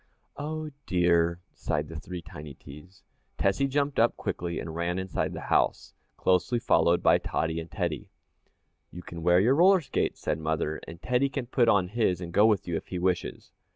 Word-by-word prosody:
"Oh, 155 +1 -4 0.2
dear!" 85 -1 +2
sighed 75 0 -2
the 80 -1 -7
three 90 0 -7
tiny 75 -2 -10
T's. 75 +7 -14 0.3
Tessie 100 +8 +1
jumped 140 +1 0
up 115 +1 +3
quickly 85 -1 -3
and 80 - -6
ran 85 +2 -2
inside 95 -2 -2
the - - -6
house, - - 0 0.2
closely 90 +6 +2
followed 85 -6 +2
by - - +5
Tottie 80 0 -2
and 80 +1 -7
Teddy. 85 -7 -3 0.8
"You 90 - -10
can 85 -1 -8
wear 90 +2 +4
your 115 +7 +4
roller 185 +6 +6
skates," 140 - -2
said - - -2
mother, 80 0 -2
"and 85 0 -9
Teddy 125 +2 +1
can 135 -1 -4
put 120 -1 +2
on 95 -5 +3
his 105 -5 +1
and 85 -2 -7
go 105 +4 +6
with 105 -5 +1
you, 85 -2 -1
if - - -8
he 90 - -4
wishes." 90 0 -2
90 Hz, 190 wpm, -28 LUFS, 85-120 Hz, 0.8 s, roller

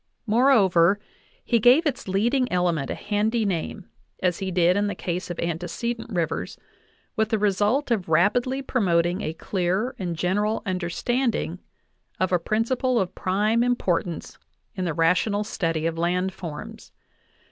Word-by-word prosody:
Moreover, 205 -6 +4 0.5
he 235 - +2
gave 250 +9 +5
its 270 -8 -2
leading 235 +7 +1
element 175 -6 0
a - - -2
handy 215 +2 0
name, 185 +1 -3 0.4
as 180 -2 +1
he 190 -1 -3
did 180 0 +3
in 205 +1 +1
the 205 - -3
case 180 +1 -4
of 175 - -5
antecedent 175 +8 -3
rivers, 170 -4 -2 0.6
with 220 -1 +1
the 220 - +1
result 210 +7 +1
of 200 -8 0
rapidly 245 +11 +2
promoting 180 -7 +1
a 160 - -3
clear 190 +8 -1
and 175 -3 -3
general 205 +6 0
understanding 185 +2 -1 0.6
of 185 0 +1
a 180 - +3
prin 215 +6 0
ciple 255 0 0
of 185 -2 -2
prime 210 +5 +1
importance 185 -8 -1 0.3
in 185 -4 -3
the 165 -3 -2
rational 180 +5 +2
study 165 -7 -2
of 165 0 -1
land 180 +2 0
forms. 160 -5 -8
195 Hz, 145 wpm, -24 LUFS, 175-225 Hz, 0.6 s, gave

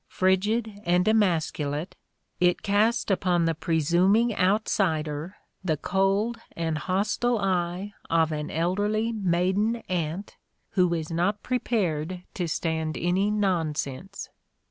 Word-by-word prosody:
Frigid 205 +3 +1
and 180 +1 +2
emascu 175 -9 +2
late, 150 +6 -4 0.4
it 180 0 +2
cast 210 +2 +2
upon 180 -3 +2
the 165 - +2
presuming 175 +8 +2
outsider 180 -4 0 0.3
the 160 -4 0
cold 195 +7 0 0.2
and 160 -2 -1
hostile 210 +7 0
eye 185 0 -1 0.2
of 165 -1 +3
an 150 -1 -3
elderly 205 +7 0
maiden 195 +2 +1
aunt 175 +2 -3 0.3
who 180 -3 +2
is 160 0 -4
not 190 +5 0
prepared 185 -9 -1
to 175 -3 -2
stand 160 -1 -2
any 185 +4 +1
nonsense. 180 -4 -2
185 Hz, 115 wpm, -26 LUFS, 165-205 Hz, 0.4 s, of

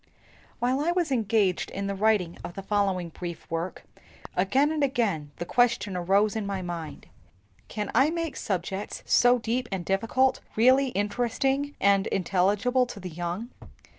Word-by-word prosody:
WHILE 255 +2 +1
I 320 +4 +1
was 345 -4 0
engaged 215 -6 +1
in 200 0 -4
writing 205 -5 +2 0.2
the 195 - -6
following 195 -4 0
brief 170 0 -7
work, 165 +2 -3 0.5
again 260 +11 +2
and 310 -2 0
again 225 - 0
the 175 - -5
question 240 -3 +1
arose 195 +4 +2
in 215 -2 -2
my 195 -2 -3
mind, 170 -4 -6 0.6
"Can 210 -2 -4
I 265 +6 +4
make 330 -1 -3
subjects 190 +1 -3
so 245 0 +5
deep 240 +2 -2
and 185 -3 -3
difficult 225 +7 +1 0.2
really 260 +5 +5
interesting 250 +6 -1
and 200 -1 +3
intelligible 200 +7 +1
to 210 - -8
the 180 -2 -7
young? 175 +7 -4
205 Hz, 145 wpm, -27 LUFS, 185-250 Hz, 0.6 s, so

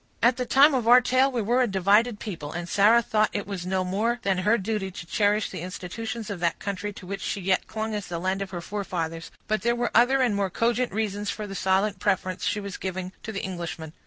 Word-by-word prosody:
At 240 +1 +5
the 250 -1 -2
time 280 +3 +6
of 245 -4 0
our 245 +1 +9
tale, 255 +2 +2
we 240 -4 -1
were 240 +5 +2
a 250 - +3
divided 205 +3 +3
people, 165 -9 -6
and 175 0 -4
Sarah 215 +6 +5
thought 215 -1 +2
it 205 - -2
was 190 -3 -5
no 185 0 0
more 215 +6 0
than 195 -2 +1
her 210 +5 +3
duty 205 -1 -2
to 175 -2 -9
cherish 205 +3 +1
the - - -6
institutions 210 +5 -5
of 195 - -5
that 170 -1 0
country 200 0 -4
to 190 - -11
which 195 +2 -5
she 205 - -2
yet 185 0 0
clung 220 0 -3
as 205 -3 -4
the 170 - -4
land 190 +3 -1
of 195 - -4
her 175 -2 -5
forefathers; 170 -5 -4 0.2
but 215 -2 0
there 235 +3 +1
were 240 0 -1
other 260 +3 +4
and 235 -5 +1
more 200 -1 0
cogent 235 +5 0
reasons 205 -1 -2
for 215 - -4
the 195 - -7
silent 195 +2 +1
preference 185 -2 -1
she 205 +1 0
was 200 -2 -6
giving 185 -1 -4
to 220 - -6
the 200 - -4
Englishman. 170 -4 -5
205 Hz, 245 wpm, -26 LUFS, 185-225 Hz, 0.2 s, our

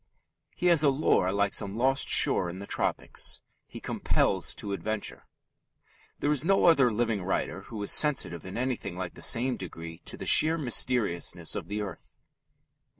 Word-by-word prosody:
He 180 - -5
has 170 -4 +5
a 150 - +4
lure 135 -9 +1
like 100 0 0
some 100 +2 0
lost 135 +3 +1
shore 90 - +4
in 85 - -8
the 100 - -8
tropics. - - -2 0.2
He - - -10
compels - - -1
to 100 - -5
adventure. 110 +2 -4 0.9
There 145 - -1
is 145 -2 +1
no 195 +3 +2
other 140 -7 +5
living 115 -2 -1
writer 95 +1 -2
who 110 +2 -9
is - - +1
sensitive 90 - +3
in 95 +3 -8
anything 125 -7 -3
like 90 -2 -5
the - - -12
same 125 +2 +3
degree 85 -2 -9
to - - -6
the - - -7
sheer 160 +2 +5
mysteriousness 120 - -1
of - - -5
the 105 +1 -3
earth. 100 - -10
110 Hz, 170 wpm, -28 LUFS, 95-135 Hz, 0.9 s, has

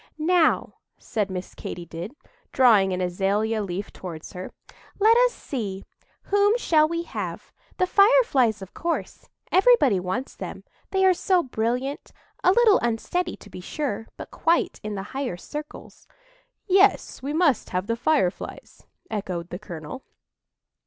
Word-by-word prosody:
"Now," 325 +1 +2 0.2
said 210 -4 -2
Miss 185 -1 -6
Katy 175 - -7
did, 170 - -7 0.4
drawing 220 -7 +5
an 185 0 -2
azalea 200 +5 0
leaf 195 0 -5
towards 165 -4 -8
her, 180 0 -7 0.5
"let 440 +3 +5
us - - +5
see—whom 290 - -2
shall 310 -9 +3
we 335 +1 -2
have? - - -6 0.3
The 370 - +3
Fireflies, 365 - +4
of 190 - -12
course; 335 0 -4 0.2
everybody 370 - +5
wants 185 +9 -4
them, - - -7 0.3
they 385 0 +2
are 375 - +6
so 360 0 +2
brilliant,—a 250 +8 -2
little 445 0 +5
unsteady, 290 +10 -1
to 205 - -15
be 180 - -8
sure, 225 - -4
but - - -9
quite 335 +1 +1
in 210 -1 -5
the 195 - -4
higher 265 -9 -3
circles." 300 +10 -9 0.6
"Yes, 390 -5 +3
we 275 +2 -3
must 305 - +2
have 185 +1 -2
the 230 +2 -1
Fireflies," 240 - -2 0.2
echoed 180 -5 -4
the 180 - -5
colonel. 170 - -8
250 Hz, 140 wpm, -24 LUFS, -, 0.6 s, are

